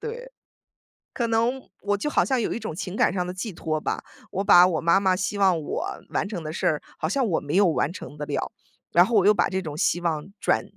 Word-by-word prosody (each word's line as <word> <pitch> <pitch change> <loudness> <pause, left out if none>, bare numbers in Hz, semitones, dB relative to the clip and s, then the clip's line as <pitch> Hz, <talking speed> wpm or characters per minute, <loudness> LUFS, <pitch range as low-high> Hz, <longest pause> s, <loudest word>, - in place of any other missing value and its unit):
对。 485 +2 -7 0.8
可 240 - -1
能 230 +3 +1 0.2
我 205 0 0
就 295 - -2
好 - - +3
像 260 -2 0
有 - - -1
一 - - -4
种 220 -8 -5
情 185 +2 -5
感 - - +3
上 180 -1 -1
的 180 - -5
寄 185 +4 -5
托 155 -3 -3
吧， - - -3 0.3
我 195 0 -1
把 180 -3 +7
我 165 -4 0
妈 170 +3 +4
妈 190 -2 +2
希 200 +2 -2
望 185 -4 +4
我 150 - -3 0.2
完 - - -1
成 180 -6 -5
的 155 0 -5
事 - - -1
儿， 150 - +1 0.2
好 155 - -1
像 265 +7 +1
我 170 - +1
没 145 +3 -4
有 200 +1 +5
完 155 -2 +1
成 160 - -9
得 150 - -4
了。 - - -2 0.4
然 175 +2 +7
后 230 - -1
我 200 -3 +4
又 210 - +7
把 - - +1
这 190 0 -1
种 155 -5 -6
希 170 - +1
望 160 -2 -2
转 - - +1
185 Hz, 275 characters per minute, -25 LUFS, 165-210 Hz, 0.8 s, 把